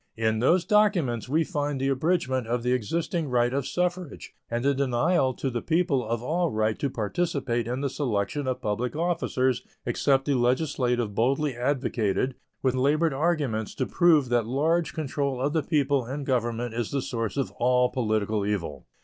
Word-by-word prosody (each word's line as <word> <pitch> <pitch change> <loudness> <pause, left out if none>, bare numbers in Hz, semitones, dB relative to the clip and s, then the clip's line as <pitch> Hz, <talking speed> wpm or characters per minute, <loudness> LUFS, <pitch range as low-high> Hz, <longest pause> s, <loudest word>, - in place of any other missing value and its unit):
In 110 -1 +1
those 165 +9 +3
documents 185 - +2
we 160 +4 +2
find 145 -5 -2
the 135 +1 0
abridgment 130 -4 0
of 120 +1 -1
the 125 - +1
existing 160 - -1
right 120 0 +2
of 140 -1 -1
suffrage 180 -2 -3 0.2
and 120 +2 -2
the 140 - +4
denial 130 +1 +1
to 135 - -2
the 120 -1 -2
people 165 -6 +1
of 115 +1 -3
all 170 +5 0
right 110 -2 0
to 140 - 0
participate 120 0 -1
in 125 +3 -2
the 140 - 0
selection 130 +1 -2
of 130 0 -2
public 115 +6 -2
officers 150 -6 0 0.2
except 135 -1 +2
the 145 - +1
legislative 125 -3 +1
boldly 135 +5 +1
advocated, 125 -2 0 0.3
with 130 -2 +2
labored 145 +4 +2
arguments 140 -8 -1
to - - -1
prove 160 -7 +3
that 120 -2 +1
large 155 +5 +1
control 140 -3 -2
of 140 +3 0
the 160 - +2
people 140 -5 +1
in 140 +3 -4
government 120 -3 -1
is 115 -1 -2
the 140 -2 -2
source 115 0 -3
of 135 - -1
all 125 +1 +3
political 110 -3 0
evil. 90 -9 -3
130 Hz, 175 wpm, -26 LUFS, 120-150 Hz, 0.3 s, the